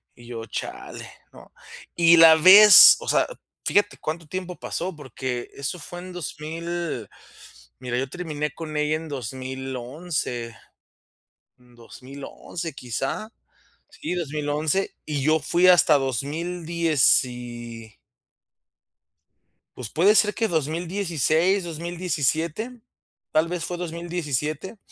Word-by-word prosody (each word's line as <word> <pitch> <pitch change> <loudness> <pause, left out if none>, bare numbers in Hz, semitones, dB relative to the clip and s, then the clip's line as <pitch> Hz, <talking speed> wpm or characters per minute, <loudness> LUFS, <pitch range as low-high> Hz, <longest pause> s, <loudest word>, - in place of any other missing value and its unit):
y 120 -1 -16
yo: 115 -2 -7
"Chale", - - -7 0.3
¿no?, - - -16 0.4
y 170 0 +6
la 165 -1 +9
vez, 195 +6 +10
o - - -10
sea, - - +2 0.4
fíjate 205 0 +1
cuánto 160 0 -5
tiempo 185 +1 -6
pasó, 180 +1 -4
porque 130 -3 -5
eso 140 +6 -5
fue 175 +3 -9
en 185 0 -9
2000, 165 - -5 0.7
mira, 125 -1 -3
yo 130 +1 -2
terminé 150 -4 -4
con 155 0 -7
ella 150 +1 +1
en 160 0 -9
2011, 130 0 -5 1.0
2011 130 +6 -9
quizá, 135 - -4 0.6
sí, - - -6
2011 150 +2 -2
y 145 -3 -3
yo 155 +2 +3
fui 175 +4 +2
hasta 175 -4 +6
dos 135 -3 -2
mil 170 +4 -5
dieci 120 -8 0 1.8
Pues 120 -4 -6
puede 195 +7 +3
ser 210 -1 +4
que 225 - 0
2016, 170 - 0
2017, 170 - -3 0.5
tal 155 +1 +2
vez 175 -1 -4
fue 175 - -5
2017. 170 - -4
155 Hz, 110 wpm, -24 LUFS, 135-175 Hz, 1.8 s, vez